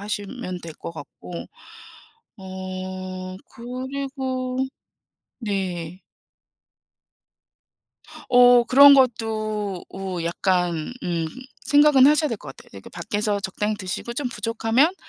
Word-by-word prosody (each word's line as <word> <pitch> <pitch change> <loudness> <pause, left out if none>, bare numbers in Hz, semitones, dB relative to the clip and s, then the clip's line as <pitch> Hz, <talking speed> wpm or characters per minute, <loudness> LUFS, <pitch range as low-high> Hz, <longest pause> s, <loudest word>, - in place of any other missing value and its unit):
하시면 200 -3 -5
될 165 - -7
것 165 - -8
같고 170 +2 -9 0.9
어 185 0 -6 0.2
그리고 260 +1 -4 0.8
네. 185 -5 -3 2.3
어 245 -1 +7
그런 280 +4 +8
것도 215 -6 0
어 190 -2 -4
약간 175 +1 0
음 170 -2 -1 0.4
생각은 290 -2 +6
하셔야 300 +1 +4
될 230 - -3
것 135 -8 -10
같아요. - - -16
그러니까 100 -1 -12
밖에서 205 +4 -2
적당히 210 +2 -2
드시고 195 +4 -5
좀 255 +1 -2
부족하면 235 +7 +1
210 Hz, 200 characters per minute, -23 LUFS, 185-250 Hz, 2.3 s, 그런